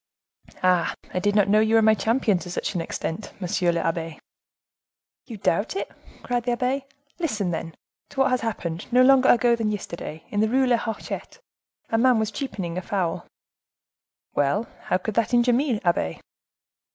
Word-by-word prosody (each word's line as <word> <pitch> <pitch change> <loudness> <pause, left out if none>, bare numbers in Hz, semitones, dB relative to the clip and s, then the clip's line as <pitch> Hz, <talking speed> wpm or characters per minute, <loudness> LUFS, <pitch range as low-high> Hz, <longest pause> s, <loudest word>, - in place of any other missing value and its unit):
"Ah! 180 -2 +3 0.2
I 180 - 0
did 205 +2 +1
not 205 -2 +4
know 210 +2 +4
you 220 +1 +3
were 225 - +6
my 220 0 +6
champion 220 -3 +1
to 175 - -8
such 175 - -3
an 175 - -1
extent, 165 +4 -4
monsieur 180 -1 +1
le 170 - -1
abbe." 165 -1 -2 1.1
"You 230 - -7
doubt 200 - 0
it!" 390 - -3 0.3
cried 245 -1 -1
the 245 - +1
abbe. 265 +2 -1 0.3
"Listen, 220 - -1
then, 165 -1 -4 0.3
to 270 - -1
what 255 -2 +2
happened, 180 -5 -4
no 250 +1 +6
longer 265 0 +6
ago 240 0 +5
than 225 -2 -1
yesterday, 170 -5 -6
in 205 - -2
the 220 +1 +3
Rue 265 +3 +3
de 250 - 0
la 240 - +5
Hochette. 225 - -5 0.5
A 225 - +2
man 255 0 +5
was 220 -1 0
cheapening 195 -8 -4
a - - -6
fowl." 185 -5 -2 1.1
"Well, 145 +11 +1 0.2
how - - +2
could 210 +4 -4
that 230 +3 +1
injure 240 0 +4
me, 250 -3 +1
abbe?" 125 - 0
215 Hz, 180 wpm, -24 LUFS, 180-245 Hz, 1.1 s, were